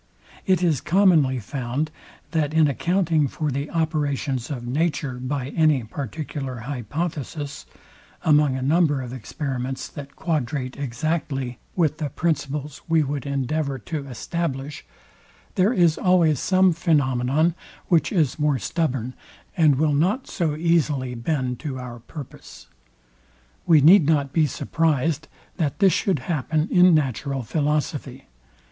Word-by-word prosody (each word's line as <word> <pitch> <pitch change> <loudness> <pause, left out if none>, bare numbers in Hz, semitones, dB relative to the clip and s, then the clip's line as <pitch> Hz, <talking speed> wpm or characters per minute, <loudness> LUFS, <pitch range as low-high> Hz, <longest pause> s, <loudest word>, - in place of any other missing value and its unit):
It 185 -2 +3
is 160 -7 +2
commonly 165 -7 +4
found, 125 +6 -3 0.4
that 155 -2 0
in 160 -1 +5
accounting 165 0 +1
for 150 +2 -3
the 140 +3 -3
operations 145 -5 -1
of 125 -5 -5
nature 140 -1 -1
by 130 +1 -3
any 155 -4 +2
particular 135 +1 -5
hypothesis; 145 - -4 0.6
among 150 -3 +4
a 130 - -3
number 145 -2 +2
of 125 0 -7
experiments, 130 +1 -4
that 140 -2 -10
quadrate 145 -5 -2
exactly 135 -1 -3 0.2
with 155 -4 +1
the 150 -2 -2
principles 150 -1 -2
we 165 -1 +3
would 140 0 -4
endeavour 140 +1 -1
to 140 +4 -5
establish; 145 +1 -4 0.7
there 190 +4 +3
is 175 -9 +3
always 170 -6 +3
some 185 -1 +3
phænomenon, 150 -1 +2 0.3
which 170 -3 +2
is 155 -8 +1
more 150 -2 +2
stubborn, 130 - -2 0.4
and 155 -6 +4
will 150 +2 +2
not 190 - +1
so 160 -6 -1
easily 150 -6 +1
bend 125 0 -2
to 140 -4 -5
our 125 -2 -7
purpose. 140 +4 -11 1.0
We 160 -4 +6
need 165 +1 +7
not 145 -3 +1
be 160 -2 +3
surprized, 160 +1 0 0.3
that 150 -7 -1
this 195 -3 +4
should 190 -5 +1
happen 155 0 0
in 180 -2 +6
natural 135 -1 -1
philosophy. 150 +3 -2
150 Hz, 130 wpm, -23 LUFS, 130-160 Hz, 1.0 s, need